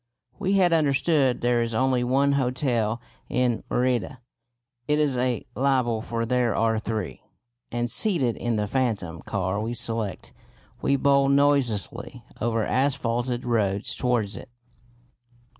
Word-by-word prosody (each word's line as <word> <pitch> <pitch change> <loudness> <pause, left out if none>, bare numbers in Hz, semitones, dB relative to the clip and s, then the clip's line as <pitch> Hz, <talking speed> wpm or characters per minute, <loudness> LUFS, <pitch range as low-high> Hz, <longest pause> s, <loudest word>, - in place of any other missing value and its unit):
We 195 -1 0
had 185 -3 +4
understood 145 -3 +2
there 120 0 +2
is 115 -1 -2
only 130 0 +2
one 135 +3 +2
hotel 125 -4 0 0.3
in 125 -2 0
Merida 125 -1 0 0.7
(it 150 - +2
is 150 -3 +1
a 125 -1 -1
libel, 125 -4 +1
for 115 0 -3
there 125 -1 +1
are 115 -1 +1
three), 110 -4 -4 0.5
and, 120 0 -1
seated 140 - +2
in 120 -1 -2
the 105 -1 0
phantom 100 - -2
car 95 +5 -2
we 115 +2 -3
select, 115 -5 -3 0.5
we 140 - +2
bowl 140 0 +3
noiselessly 140 -7 +1 0.2
over 115 -1 0
asphalted 125 -2 0
roads 110 0 0
towards 120 -5 0
it. - - -9
125 Hz, 130 wpm, -25 LUFS, 115-135 Hz, 0.7 s, had